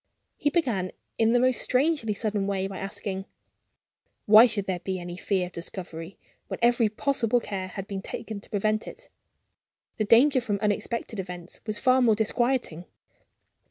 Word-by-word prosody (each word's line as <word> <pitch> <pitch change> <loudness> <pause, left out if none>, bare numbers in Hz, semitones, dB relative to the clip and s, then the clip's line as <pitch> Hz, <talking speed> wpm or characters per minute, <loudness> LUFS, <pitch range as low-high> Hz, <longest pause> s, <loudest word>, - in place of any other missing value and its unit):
He 290 - +1
began 240 - 0 0.3
in 225 0 +4
the 245 - +4
most 255 0 +2
strangely 255 -5 +1
sudden 205 -2 -1
way 195 -1 -1
by 195 -1 -5
asking: 195 -1 -5 1.0
"Why 215 +3 +9
should 210 -4 -2
there 185 -2 -2
be 190 +1 -3
any 175 0 -6
fear 185 0 0
of 180 - -9
discovery, 170 0 -7 0.3
when - - -4
every 235 -2 +3
possible 245 0 +1
care 195 -5 -4
had 195 +1 -7
been 195 -1 -4
taken 220 0 -6
to - - -14
prevent 215 +1 0
it? - - -10 0.9
The 215 - 0
danger 255 +5 +5
from 210 -4 -1
unexpected 210 +1 -2
events 180 -2 -7
was 215 -1 -1
far 255 +4 +4
more 225 -3 +4
disquieting. 220 -5 0
210 Hz, 160 wpm, -26 LUFS, 190-235 Hz, 1.0 s, Why